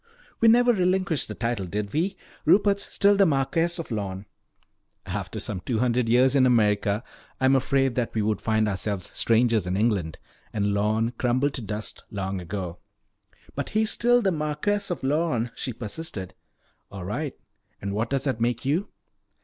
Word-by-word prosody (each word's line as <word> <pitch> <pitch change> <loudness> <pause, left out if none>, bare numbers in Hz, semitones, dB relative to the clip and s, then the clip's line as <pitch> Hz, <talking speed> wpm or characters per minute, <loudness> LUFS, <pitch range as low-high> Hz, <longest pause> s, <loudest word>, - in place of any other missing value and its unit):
"We 230 - +5
never 245 +2 +6
relinquished 185 - +1
the 105 - -6
title, 115 -4 -2
did 100 +2 -3
we? 185 +5 0 0.3
Rupert's 200 0 +3
still 200 0 +4
the 195 -1 +5
Marquess 165 +4 +1
of 165 -6 -6
Lorne." 100 -2 -3 0.8
"After 95 +2 -4
some 105 -2 -4
two 115 +5 -2
hundred 120 0 +1
years 125 +2 +5
in 130 -2 +5
America 105 -2 +2 0.4
I 130 - +1
am 135 +1 +5
afraid 135 -1 +2
that 120 -2 -2
we 110 - +1
would 110 0 0
find 110 -1 +1
ourselves 100 -1 -2
strangers 115 -4 +2
in 90 +1 -1
England. 100 -8 0 0.4
And 100 -1 0
Lorne 110 +3 +1
crumbled 130 +3 +1
to 130 - -3
dust 105 0 -5
long 95 -2 -3
ago." 90 0 -5 0.7
"But - - -4
he's 220 0 +2
still 245 0 +3
Marquess 185 +4 0
of 175 - -4
Lorne," 135 -5 0
she 130 - -4
persisted. 110 - -6 0.6
"All 95 -3 -7
right. 135 +9 -3 0.4
And 100 0 -4
what 110 +3 -1
does 135 -1 0
that 130 -5 -1
make 120 +1 0
you?" 165 +9 +1
120 Hz, 165 wpm, -25 LUFS, 105-150 Hz, 0.8 s, never